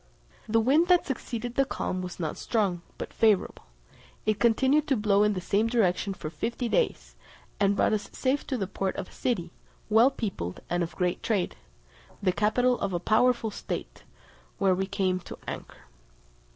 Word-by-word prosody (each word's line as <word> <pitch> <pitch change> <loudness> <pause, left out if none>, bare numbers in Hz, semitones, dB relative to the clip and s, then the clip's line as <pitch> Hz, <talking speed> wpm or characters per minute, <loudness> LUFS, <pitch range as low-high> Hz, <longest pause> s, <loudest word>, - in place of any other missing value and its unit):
The 225 +1 +4
wind 285 +9 +4
that 360 -1 +4
succeeded 240 -3 -4
the 275 - +3
calm 185 -8 -3
was 180 0 -7
not 160 -3 -2
strong, 195 -7 0 0.2
but - - -6
favourable; 215 -4 +2 0.6
it 215 -1 +1
continued 265 +7 +3
to 275 - +3
blow 205 -1 +3
in 210 0 +3
the 185 - -2
same 200 +5 +1
direction 200 -4 +1
for 155 - -6
fifty 235 - -3
days, 485 - 0 0.4
and 200 0 +3
brought - - +2
us 210 -1 -2
safe 270 +2 -1
to 260 - -1
the 200 - -1
port 190 0 -3
of - - -5
a - - -18
city, 175 -9 -2 0.4
well 225 +4 +7
peopled, 195 - -4
and 175 0 +1
of 170 - -3
great 180 -1 -1
trade, 200 -6 0 0.6
the 195 -3 +2
capital 230 +7 +2
of 195 -2 -2
a 175 - 0
powerful 225 +3 +2
state, - - -6 0.6
where 195 -1 +3
we 190 +1 -1
came 190 -2 0
to 175 - -10
anchor. - - -7
210 Hz, 180 wpm, -28 LUFS, 185-240 Hz, 0.6 s, well